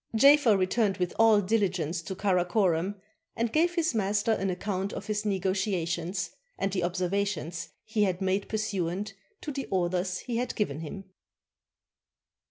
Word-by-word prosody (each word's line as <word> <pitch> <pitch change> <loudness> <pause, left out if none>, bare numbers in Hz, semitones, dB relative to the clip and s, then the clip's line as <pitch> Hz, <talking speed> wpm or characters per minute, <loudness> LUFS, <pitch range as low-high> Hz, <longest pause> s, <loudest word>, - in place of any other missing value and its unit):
Jafer 275 -3 +6
returned 195 +1 +1
with 180 -2 -1
all 225 -2 +6
diligence 185 -5 0
to 190 +3 -6
Caracorom, 185 -1 +1 0.4
and 230 0 -1
gave 345 +3 +3
his 335 -5 +1
master 205 0 +1
an 195 -3 0
account 190 +1 -2
of - - -6
his 210 0 -2
negotiations, 185 -2 -1 0.3
and 195 - -1
the 185 -1 -1
observa 185 +3 0
tion 170 -4 -4 0.3
he 215 0 -1
had 185 -3 +2
made 190 +1 0
pursuant 200 -2 -2 0.3
to 300 - -4
the 275 -1 -4
orders 180 0 0
he 240 -2 -3
had 250 +1 -2
given 155 - -1
him. 165 +5 -6
195 Hz, 150 wpm, -28 LUFS, 180-215 Hz, 0.4 s, Jafer